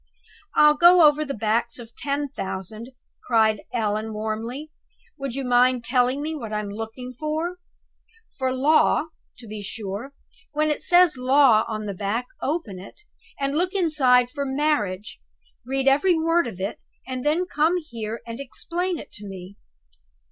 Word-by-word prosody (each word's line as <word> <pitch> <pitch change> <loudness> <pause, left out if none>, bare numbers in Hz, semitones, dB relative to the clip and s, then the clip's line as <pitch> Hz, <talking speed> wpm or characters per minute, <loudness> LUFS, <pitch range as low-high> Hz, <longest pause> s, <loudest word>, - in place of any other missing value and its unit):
"I'll 300 0 +7
go 345 +3 +7
over 300 +1 +2
the 275 -2 -4
backs 225 +2 0
of 235 -1 -12
ten 285 0 -2
thousand!" 215 -1 -6 0.3
cried 220 -3 +2
Allan, 220 -2 -1
warmly. 225 +8 -4 0.5
"Would 275 -3 -4
you 270 -1 -3
mind 250 0 +3
telling 255 +3 +1
me 315 +1 -3
what 235 -8 -6
I'm 210 -1 -3
to 200 - -7
look 225 0 -5 0.3
for?" 320 +4 -2 0.8
"For 260 -1 0
'Law,' 295 +3 +3 0.3
to 235 - -12
be 215 0 -7
sure! 205 +3 -5 0.4
When 305 +1 +1
it 300 - -2
says 350 -5 +5
'Law' 255 -3 +5
on 215 -2 -4
the 200 - -3
back, 205 +5 -2 0.2
open 270 - -3
it, 195 - -12 0.4
and 275 0 -1
look 360 +3 0
inside 260 -9 +3
for 285 0 -3
Marriage 265 -9 -1 0.5
read 270 0 -1
every 295 +7 +4
word 330 +1 +2
of 200 -6 -8
it 195 +3 -4 0.3
and 255 -1 -4
then 315 +5 +1
come 330 +1 +1
here 230 -9 -6
and 230 +2 -7
explain 345 +6 -3
it 295 - -10
to 205 0 -8
me. 190 0 -9
255 Hz, 160 wpm, -24 LUFS, 220-300 Hz, 0.8 s, I'll